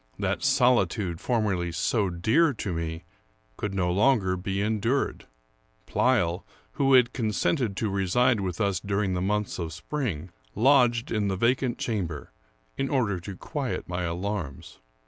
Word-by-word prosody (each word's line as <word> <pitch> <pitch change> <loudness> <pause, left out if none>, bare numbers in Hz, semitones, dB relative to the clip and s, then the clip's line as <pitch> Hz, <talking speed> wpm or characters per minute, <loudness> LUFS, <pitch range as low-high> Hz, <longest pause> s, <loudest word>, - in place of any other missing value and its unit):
That - - -1
solitude 115 -8 +2
formerly 100 -8 0
so 100 +3 0
dear 125 - +2
to 100 -4 -3
me 80 0 -4 0.5
could 105 - -4
no 90 -2 +1
longer 100 -2 +3
be 95 +2 -3
endured. 110 +6 -1 0.6
Pleyel, 100 -9 +1 0.3
who 135 -1 +2
had 125 -1 +5
consented 110 - 0
to 110 - 0
reside 105 +5 +2
with 90 -3 -3
us 100 -4 +1
during 100 -1 -1
the 90 - -1
months 105 +1 -1
of 85 -2 -3
spring, 90 - -4 0.2
lodged 120 -1 +3
in 105 -2 0
the 95 -1 -1
vacant 120 +3 +1
chamber, 90 - -3 0.5
in 135 0 0
order 115 -10 +1
to 90 +2 -8
quiet - - -4
my 90 0 -3
alarms. 85 -4 -4
100 Hz, 145 wpm, -27 LUFS, 90-120 Hz, 0.6 s, had